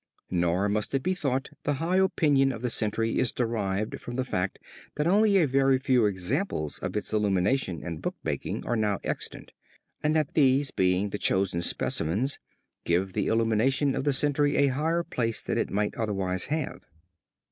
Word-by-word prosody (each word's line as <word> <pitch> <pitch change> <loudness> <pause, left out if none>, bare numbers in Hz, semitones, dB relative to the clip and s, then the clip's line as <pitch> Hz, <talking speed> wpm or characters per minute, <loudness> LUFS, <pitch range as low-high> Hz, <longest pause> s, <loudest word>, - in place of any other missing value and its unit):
Nor 90 +2 +1
must 105 +5 -1
it 135 - 0
be 185 - +1
thought 135 -6 -2
the 145 - 0
high 165 +6 0
opinion 145 -7 +3
of 115 -1 -7
the 125 - 0
century 115 +1 0
is 125 - +2
derived 110 -4 -2
from 120 - -7
the 130 0 -1
fact 95 -6 -2 0.4
that 150 - -1
only 200 +3 +4
a 175 - +4
very 135 -1 +3
few 130 -4 +3
examples 95 - -1
of - - -3
its - - -3
illumination 100 - +1
and 85 -3 -5
bookmaking - - -4
are 120 - 0
now 105 -3 +1
extant, - - -4 0.5
and 150 +1 +1
that 155 -3 0
these 135 -1 +3
being 95 +2 +1
the 105 - -4
chosen 95 -3 +1
specimens 105 - -1 0.4
give 90 +3 0
the - - -1
illumination 115 +5 +2
of - - -2
the 145 - +2
century 145 +1 +1
a 140 -1 +4
higher 160 +6 0
place 115 -7 -2
than - - -1
it - - -1
might 105 +1 -1
otherwise 95 -4 -1
have. 155 -1 -3
120 Hz, 175 wpm, -27 LUFS, 100-140 Hz, 0.5 s, only